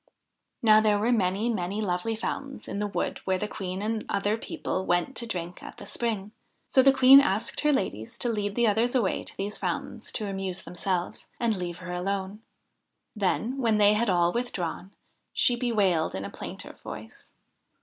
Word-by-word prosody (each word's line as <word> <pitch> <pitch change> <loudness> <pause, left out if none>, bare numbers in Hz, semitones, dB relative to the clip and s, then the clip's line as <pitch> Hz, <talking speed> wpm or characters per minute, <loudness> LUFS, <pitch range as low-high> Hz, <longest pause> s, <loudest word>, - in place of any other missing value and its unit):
Now 215 -1 +7
there 210 -1 +3
were 220 +4 +1
many, 200 -1 +1
many 200 -3 -1
lovely 200 +2 -1
fountains 275 +4 -5
in 200 - -4
the 210 - 0
wood 200 - -2
where 190 -1 +1
the 210 - -2
Queen 190 -1 -5
and 220 0 -1
other 200 +2 +1
people 190 -4 -3
went 175 +9 0
to 235 - -1
drink 175 -4 -5
at - - -10
the - - -9
spring; 215 -4 -2 0.4
so 260 - +5
the 275 +1 +7
Queen 265 0 +9
asked 210 -5 0
her 300 - +3
ladies 110 - -2
to 240 - 0
lead 205 -2 -1
the 240 - +3
others 225 +4 +2
away 225 -7 +1
to - - -7
these 205 +2 -3
fountains - - -3
to 215 - -2
amuse 195 -2 -3
themselves, 180 0 -3
and 230 -2 +1
leave 175 -2 -4
her 185 0 -7
alone. 195 +3 -3 0.7
Then, 220 +6 0
when 225 -4 +2
they 205 0 +6
had 220 +1 +1
all 175 -1 +3
withdrawn, 195 -6 -3 0.4
she 245 - +4
bewailed 205 - +1
in 95 +1 -4
a - - -6
plaintive - - -8
voice. - - -10
205 Hz, 185 wpm, -27 LUFS, 185-230 Hz, 0.7 s, Queen